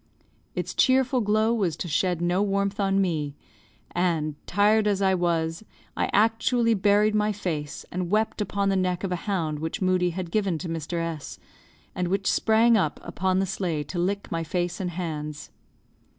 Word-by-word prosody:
Its - - -3
cheerful 260 -1 +3
glow 215 +2 +2
was 190 -9 0
to - - -4
shed 175 +2 0
no 175 +2 +2
warmth 200 0 0
on 195 -1 +2
me, 155 -7 -1 0.6
and, 165 -4 0
tired 210 +2 +3
as 200 -2 +1
I 190 -1 +3
was, 170 0 0 0.3
I - - 0
actually 230 +2 +3
buried 210 +1 +3
my 210 0 +2
face 160 -8 -4
and 180 -1 -3
wept 215 +2 +1
upon 200 -1 0
the 195 - +2
neck 185 -1 0
of 195 - -2
a - - +1
hound 160 -6 -1
which 160 +5 -3
Moodie 185 -2 +2
had 180 -1 -5
given 195 -5 +1
to 175 - -6
Mr. 165 +1 -3
S, 165 -3 -4 0.6
and 180 -1 -1
which 195 +2 -1
sprang 225 +1 +4
up 185 -8 +1
upon 185 0 -1
the 190 - +2
sleigh 175 -5 -2
to 175 +5 -5
lick 200 +3 -1
my 165 0 -1
face 175 +2 -2
and 185 -2 -2
hands. 155 -4 -5
185 Hz, 180 wpm, -26 LUFS, 170-205 Hz, 0.6 s, sprang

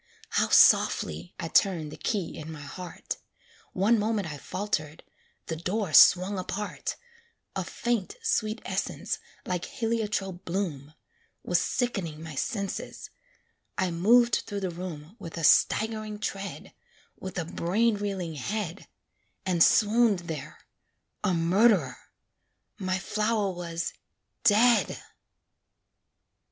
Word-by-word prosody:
How - - +1
softly 80 +3 +4
I 165 - -3
turned 165 -4 +2
the - - -7
key 200 -7 -2
in 160 +1 -7
my 150 -2 -8
heart; 175 +4 -6 0.6
One 210 +5 +3
moment 205 -5 -1
I 145 - -8
faltered 165 -6 -3 0.4
the 165 - -3
door 185 +2 -2
swung 185 +5 +7
apart 200 +3 -4 0.6
A - - -1
faint, 235 -5 -2
sweet 220 - 0
essence, - - -2 0.3
like 180 -1 -2
heliotrope 210 -5 -2
bloom, 160 -6 -3 0.5
Was 175 -1 +2
sick'ning 195 -11 -2
my 160 -1 -8
senses; 200 - -4 0.7
I 185 -2 +1
moved 235 +8 +4
through 205 -1 -4
the 185 -2 -2
room 170 0 -7
With 170 -5 -8
a 165 - -4
staggering 215 +5 +3
tread, 200 -1 -5 0.5
With 190 0 -7
a 175 - -1
brain 210 +8 +1
reeling 195 -5 -3
head, 180 +4 -4 0.6
And 175 -3 +4
swooned 215 -3 +4
there 155 -3 -7 0.6
a 205 - +2
murd'rer 170 - +3 0.8
my 185 -1 0
flower 210 +1 0
was 170 -2 -4 0.5
dead. 230 +2 +4
190 Hz, 115 wpm, -28 LUFS, 165-210 Hz, 0.8 s, swung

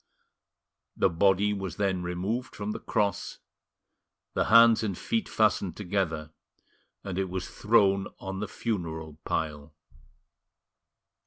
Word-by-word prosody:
The 95 - +4
body 100 +4 +3
was 95 -4 -4
then 95 -3 0
removed 95 +9 -3
from 105 0 -3
the - - -5
cross, 100 -1 -1 1.0
the - - +1
hands 115 0 +7
and 100 -5 -2
feet 225 -3 -1
fastened 105 -4 +1
together, 85 -6 -2 0.7
and 95 -1 -3
it 95 -1 -1
was 95 0 -4
thrown 100 -3 +3
on 95 0 -6
the 105 - -3
funeral 80 -9 -4
pile. 75 -1 -3
95 Hz, 115 wpm, -28 LUFS, 90-105 Hz, 1.0 s, hands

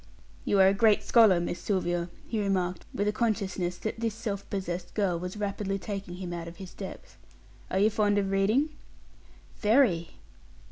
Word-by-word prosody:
"You 200 - +2
are 190 - +8
a 195 - +5
great 210 0 +4
scholar, 205 -4 +6
Miss 175 0 -3
Sylvia," 175 -3 -1 0.2
he 220 -2 -1
remarked, 185 -3 -1
with 205 - -1
a - - +3
consciousness 195 -5 -1
that 220 +1 -4
this 225 -2 -1
self 200 -3 -4
possessed 180 -2 -4
girl 190 -5 +1
was 180 +3 -5
rapidly 200 -1 -2
taking 195 -3 -5
him 180 -1 -5
out 170 -1 -5
of 170 - -9
his 190 -1 -9
depth. 195 - -9 0.5
"Are - - -1
you 210 +3 +4
fond 205 -1 +2
of 195 -1 0
reading?" 215 +10 +2 0.9
"Very." 210 -7 +3
195 Hz, 175 wpm, -28 LUFS, 180-210 Hz, 0.9 s, are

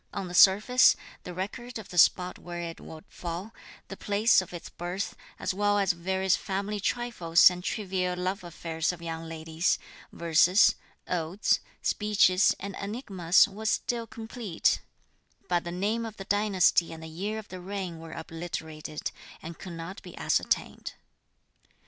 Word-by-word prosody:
On 195 -2 -3
the 175 - -8
surface, 210 +8 +6 0.3
the - - -5
record 240 +7 -5
of 220 - -9
the 180 - -7
spot 180 +2 +4
where 175 0 -7
it 165 -1 -6
would 160 -1 -11
fall, 180 +6 -6 0.3
the - - -7
place 205 +1 +3
of 185 - -10
its 175 -1 -7
birth, 180 +3 -4 0.2
as - - -2
well 205 +1 +2
as 195 -2 +2
various 190 +2 +1
family 200 +2 -3
trifles 190 -7 +4
and 180 0 -7
trivial 185 -3 -2
love 185 +2 -2
affairs 165 -1 -2
of 180 - -9
young 165 0 -5
ladies, 160 +1 0 0.3
verses, 170 +4 +5 0.3
odes, 175 +3 +1 0.2
speeches 205 -3 +3
and 200 -1 -6
enigmas 200 -5 +3
was 215 +2 -3
still 230 +2 -1
complete; 225 -5 -1 0.7
but 175 -1 0
the 170 - -4
name 205 +6 -1
of 225 -2 -7
the 195 - -7
dynasty 195 -4 +3
and 160 0 -9
the - - -7
year 195 +7 -4
of 215 -2 -8
the 185 -1 -8
reign 185 -3 -5
were 165 0 -9
obliterated, 160 -2 -6 0.3
and 165 +1 -9
could 185 - -8
not 165 +3 -7
be 180 -3 -12
ascertained. - - -1
185 Hz, 155 wpm, -28 LUFS, 170-205 Hz, 0.7 s, surface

